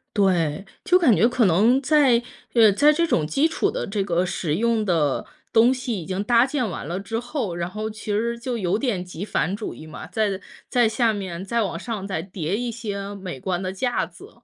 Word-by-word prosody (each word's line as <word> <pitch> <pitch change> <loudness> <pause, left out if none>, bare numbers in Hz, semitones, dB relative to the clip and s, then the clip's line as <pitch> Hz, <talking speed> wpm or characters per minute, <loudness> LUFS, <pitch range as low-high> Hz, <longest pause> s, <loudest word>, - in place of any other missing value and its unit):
对， 180 -4 +1 0.2
就 365 - +5
感 320 -10 +5
觉 220 - +4
可 250 0 +1
能 215 +8 +4
在 270 -4 +4 0.3
呃， 225 -3 +6
在 290 +9 +5
这 335 +2 +2
种 160 - +1
基 280 - +2
础 - - 0
的 - - -3
这 200 0 -2
个 180 -2 +1
使 165 -3 -2
用 225 +2 +1
的 160 -7 +1 0.3
东 235 +3 +5
西 250 -6 -3
已 - - -8
经 190 +3 -2
搭 235 +2 +4
建 265 -3 -1
完 165 - -6
了 175 +3 -3
之 225 +4 -3
后， 245 - -3
然 170 0 -3
后 215 +3 -4
其 215 -1 -5
实 235 +3 -1
就 245 0 -3
有 190 -2 0
点 230 -9 -1
极 180 +1 -7
繁 195 - -1
主 210 +2 -5
义 155 - -11
嘛， 155 - -9
在 205 -4 -1 0.3
在 245 -2 +3
下 225 +1 +2
面 190 -4 -5
再 230 +4 0
往 180 -4 -3
上 210 0 -5
再 185 -5 -2
叠 180 -1 -3
一 240 +2 -2
些 205 -3 -5
美 185 -9 -7
观 180 -1 -2
的 185 0 -3
架 245 +5 0
子， - - -14
210 Hz, 235 characters per minute, -23 LUFS, 185-235 Hz, 0.3 s, 呃